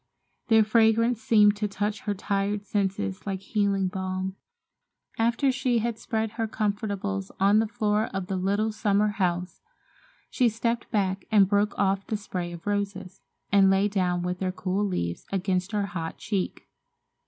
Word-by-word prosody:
Their 220 -1 +6
fragrance 225 +1 +3
seemed 210 -2 +5
to 210 0 -1
touch 205 +1 -2
her 205 -1 -2
tired 200 +1 -1
senses 195 - -2
like 190 -1 -2
healing 200 -2 0
balm. 185 0 -3 0.8
After 235 +4 +2
she 255 -2 0
had 230 0 -1
spread 220 -2 -2
her 225 0 -2
comfortables 200 - -2
on 200 +2 +5
the 225 - +1
floor 210 0 0
of 195 -1 -4
the 190 - -3
little 200 +4 0
summer 210 -1 +2
house, 180 -3 -2 0.7
she 250 -3 +3
stepped 230 +1 -2
back 195 -3 0
and 205 -3 +5
broke 205 +2 +1
off 195 0 +1
the 215 - -1
spray 180 -4 -5
of 170 -1 -10
roses, 200 -2 -3 0.3
and 195 -1 +6
lay 195 +1 +3
down 180 -3 0
with 180 0 -2
their 185 -1 -1
cool 185 +2 -2
leaves 85 - -3
against 190 0 -1
her 205 -2 0
hot 170 -4 -5
cheek. 200 -4 -3
200 Hz, 160 wpm, -26 LUFS, 190-215 Hz, 0.8 s, Their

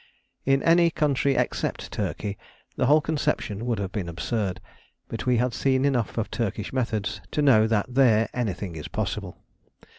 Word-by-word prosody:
In 135 0 +3
any 170 0 +5
country 140 -3 +1
except - - -2
Turkey 100 -1 -3 0.4
the 125 - +1
whole 150 +3 +6
conception 120 -8 -1
would 120 -2 0
have 100 -1 -3
been 95 -6 -3
absurd; 95 +3 -2 0.5
but - - -5
we 125 -1 +4
had 125 +1 +1
seen 130 0 +1
enough 125 -6 0
of 115 - -2
Turkish 105 -1 -3
methods 110 -5 -1
to 150 - 0
know 110 -6 +6
that 110 -2 +1
there 125 -4 +4
anything 100 -7 -3
is 75 - -6
possible. - - -4
115 Hz, 160 wpm, -25 LUFS, 105-135 Hz, 0.5 s, whole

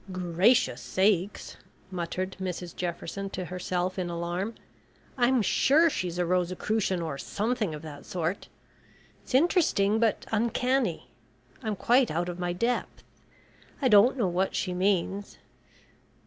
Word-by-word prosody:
"Gracious 185 +7 +2
sakes," 195 0 0 0.3
muttered 185 +1 -3
Mrs 180 -2 -4
Jefferson 180 +3 -4
to 185 -1 -5
herself 180 +1 -2
in 180 -1 -2
alarm. 175 +6 -3 0.6
"I'm 250 -2 +3
sure 310 - +4
she's 175 -6 -3
a 180 - +1
Rosicrucian 185 +2 0
or 140 -4 -4
something 215 -5 -2
of 150 - -9
that 145 -2 -10
sort. 175 +2 -3 0.7
It's - - -4
interesting, 260 - +3
but 225 -2 +1
uncanny. 230 - 0 0.5
I'm 215 -2 -2
quite 245 +5 +3
out 175 +3 -1
of 175 0 -6
my 175 0 -1
depth. 235 +8 -2 0.8
I 265 - +2
don't 215 +5 +6
know 220 -6 +1
what 180 +2 0
she 180 - -1
means. 195 +1 0
185 Hz, 130 wpm, -28 LUFS, 175-225 Hz, 0.8 s, don't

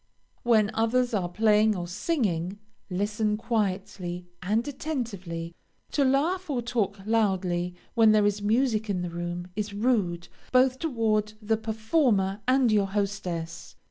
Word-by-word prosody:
When 220 -3 +3
others 240 +2 +1
are 185 -4 0
playing 215 +2 +3
or 175 -2 -4
singing, 195 - -1 0.3
listen 210 +3 0
quietly 190 -5 -2 0.2
and 215 +7 0
attentively; 200 - -4 0.4
to 285 - +2
laugh 320 +7 +1
or 250 -4 -1
talk 215 -4 -1
loudly 185 -5 +1 0.2
when 225 -3 +6
there 215 -1 +4
is 205 0 +1
music 220 0 +1
in 180 -3 -1
the 175 - -4
room, 175 +1 -4
is 205 -1 -3
rude, 200 -7 0 0.2
both 255 0 +4
toward 220 -8 0
the 220 0 +1
performer 220 -2 +1
and 255 -2 +4
your 205 -2 +3
hostess. 190 -5 -3
210 Hz, 135 wpm, -27 LUFS, 190-235 Hz, 0.4 s, when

